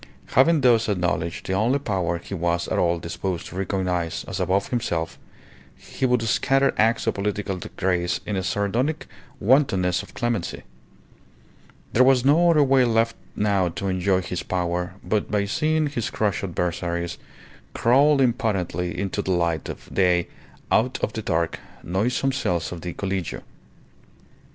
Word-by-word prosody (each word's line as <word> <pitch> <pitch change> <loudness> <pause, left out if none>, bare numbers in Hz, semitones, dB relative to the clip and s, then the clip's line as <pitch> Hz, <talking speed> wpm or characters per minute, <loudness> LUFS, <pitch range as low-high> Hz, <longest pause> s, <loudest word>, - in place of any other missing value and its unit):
Having 150 +4 +4
thus 115 -3 +4
acknowledged 90 -3 -1
the 95 - -2
only 115 +8 +2
power 95 -10 -1
he 85 - -9
was 85 -1 0
at - - 0
all 85 -1 +2
disposed 85 +1 -4
to - - -9
recognize 90 -3 -1
as 95 - -4
above 95 +2 +1
himself, 85 -10 -2 0.6
he 130 - -3
would 125 -2 +2
scatter 135 +4 +2
acts 115 +2 +2
of 115 - +1
political 100 -1 -2 0.2
grace 90 -2 0
in 105 - -2
a 95 - 0
sardonic 105 - -1 0.3
wantonness 95 -8 +3
of 100 - -14
clemency. 120 -6 -2 1.3
There 125 - +6
was 130 -1 +4
no 165 +5 +5
other 155 -3 +5
way 135 -1 +4
left 115 -1 +2 0.2
now 100 -3 +1
to 85 +4 -4
enjoy 95 0 +1
his 90 -1 -4
power 90 0 -2
but 105 -2 -1
by 105 -1 +1
seeing 155 +9 +1
his 140 -6 -2
crushed 105 -4 -1
adversaries 85 -1 -2 0.6
crawl 140 +4 +4
impotently 105 -8 0
into 100 +1 -2
the 95 - -6
light 85 -3 0
of - - -8
day 90 -2 +2 0.4
out 125 +3 +2
of 110 - 0
the 110 - -3
dark, 85 -4 -1 0.2
noisome 120 +9 0
cells 90 -10 -1
of 85 -2 -6
the 90 0 -5
Collegio. 95 -3 -3
100 Hz, 150 wpm, -24 LUFS, 90-120 Hz, 1.3 s, There